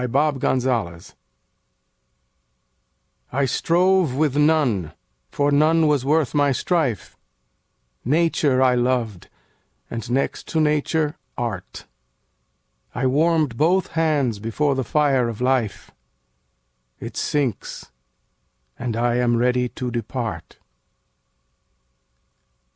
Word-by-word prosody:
9 125 - -2
Autoplay 130 - 0 2.2
I 135 +2 +1
strove 175 +2 +2
with 145 -1 +1
none, 145 - +2 0.4
for 145 0 0
none 155 +3 +3
was 145 -4 +2
worth 150 0 +1
my 145 -1 +3
strife: 135 - -1 0.9
Nature 145 -2 +2
I 130 -1 +4
loved, 120 -6 -1 0.6
and, 115 0 -5
next 130 +3 -1
to 160 - -1
Nature, 150 0 0 0.2
Art: 110 -7 -5 1.1
I 130 - -1
warm'd 150 -1 +2
both 175 +5 +2
hands 150 -9 0
before 125 +7 0
the 135 -1 -1
fire 135 -2 +1
of 115 - -7
Life; 125 -4 -1 1.1
It - - -8
sinks; 135 - -3 0.9
and 115 -2 -3
I 120 0 +1
am 120 -1 +2
ready 125 +1 +1
to 125 +1 -5
depart. 115 -6 -5
130 Hz, 100 wpm, -22 LUFS, 120-150 Hz, 2.2 s, I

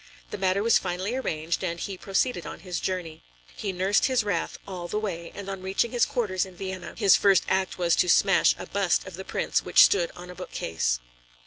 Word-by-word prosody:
The - - -4
matter 190 +1 +1
was 230 0 +4
finally 185 +4 -3
arranged, 170 -10 -2
and 170 -2 -2
he 195 - -4
proceeded 195 +1 -1
on - - -8
his 180 -2 -4
journey. 180 -4 -4 0.3
He 200 - -3
nursed 190 +3 +2
his 260 -4 +2
wrath 200 -5 -2
all 180 -3 -6
the 210 - -3
way, 175 -6 -4
and 200 -1 -7
on 195 -1 -5
reaching 190 +5 0
his 245 - +2
quarters 215 -9 -1
in 190 -1 -9
Vienna, 190 0 -6
his 200 -4 +6
first 195 -3 +4
act 190 0 0
was 175 -2 +2
to 180 - +3
smash 195 +1 +4
a - - -7
bust 195 -3 0
of 190 - -9
the 190 +3 -7
Prince - - -1
which - - +7
stood 175 -4 +2
on 180 0 -9
a - - -11
bookcase. 80 - -2
190 Hz, 215 wpm, -26 LUFS, 175-200 Hz, 0.3 s, which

